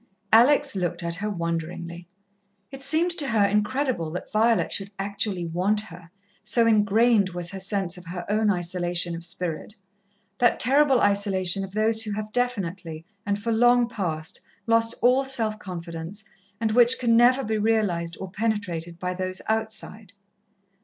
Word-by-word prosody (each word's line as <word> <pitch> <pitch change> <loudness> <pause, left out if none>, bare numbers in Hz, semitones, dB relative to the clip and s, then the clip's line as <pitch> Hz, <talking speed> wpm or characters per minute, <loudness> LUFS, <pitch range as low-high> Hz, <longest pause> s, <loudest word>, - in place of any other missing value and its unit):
Alex 270 +3 +5
looked 175 -2 -2
at 170 0 -2
her 210 +3 -3
wonderingly. 170 -1 -4 0.6
It 270 - -9
seemed 315 +6 +3
to 285 - 0
her 220 -4 +3
incredible 210 - 0
that 180 - -6
Violet 225 +1 +2
should 195 0 -2
actually 195 -2 -2
want 185 +6 0
her, 175 -4 -12 0.3
so 230 +3 +2
engrained 215 -1 +3
was 175 -1 -3
her 195 - -6
sense 190 -2 -2
of 180 - -12
her 175 0 -6
own 215 +1 +1
isolation 175 -1 -1
of 165 - -8
spirit. 175 +2 -3 0.6
That 240 -1 +3
terrible 275 +1 +4
isolation 195 -2 +2
of 190 0 -8
those 220 +1 +2
who 215 -2 -3
have 215 +1 -5
definitely, 185 -10 -3 0.2
and 200 0 +1
for 225 +3 -3
long 240 +1 +4
past, 165 -9 -3 0.2
lost 230 0 +2
all 255 +3 +4
self 225 -5 -1
confidence, 170 +1 -7 0.4
and 220 -1 0
which 240 +1 +5
can 235 -2 +2
never 250 +3 +5
be 220 0 -1
realized 200 -7 0
or 190 -1 -7
penetrated 190 -6 -3
by 180 +1 -3
those 185 0 -4
outside. 220 -2 -3
205 Hz, 155 wpm, -25 LUFS, 175-230 Hz, 0.6 s, Alex